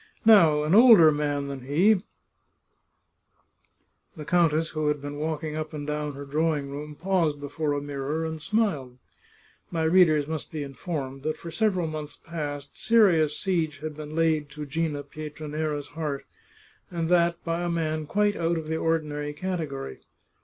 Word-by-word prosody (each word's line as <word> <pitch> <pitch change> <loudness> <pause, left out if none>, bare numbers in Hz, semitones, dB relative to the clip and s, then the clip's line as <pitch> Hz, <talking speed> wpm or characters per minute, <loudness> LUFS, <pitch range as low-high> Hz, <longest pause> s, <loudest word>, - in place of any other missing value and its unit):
Now, 165 -9 +6
an 155 +3 +1
older 215 -8 +8
man 145 -1 -1
than 140 -1 -6
he 180 +10 +3 1.4
" - - -34
The 150 - -7
countess, 165 -1 +2
who 155 -1 -1
had 150 0 +1
been 145 +1 -6
walking 155 0 -3
up 155 0 -4
and 145 -1 -5
down 150 0 -3
her 140 +1 -7
drawing 150 -1 -1
room, 150 +1 -7
paused 165 -4 0
before 145 +1 -2
a 145 - -2
mirror, 145 +3 -3
and 160 -1 -5
smiled. 155 - -1 0.7
My 165 -2 -1
readers 160 -3 +4
must 160 -2 -5
be 155 -2 -4
informed 135 -1 -5
that 155 +2 -2
for 170 - -8
several 185 -2 +1
months 155 -2 -6
past 145 -4 -6
seri 215 -8 +5
ous 150 -1 0
siege 165 -6 0
had 155 +1 -6
been 155 0 -8
laid 160 -3 +1
to 150 0 -7
Gina 150 0 -2
Pietranera's 150 0 -5
heart, 150 -3 -4 0.6
and 165 -2 -2
that 170 -1 +3
by 165 0 -2
a 175 - -1
man 155 -2 -1
quite 205 +4 +1
out 170 0 0
of 155 -1 -5
the 160 - 0
ordinary 150 -3 -1
category. 150 - -4
155 Hz, 165 wpm, -26 LUFS, 145-165 Hz, 1.4 s, older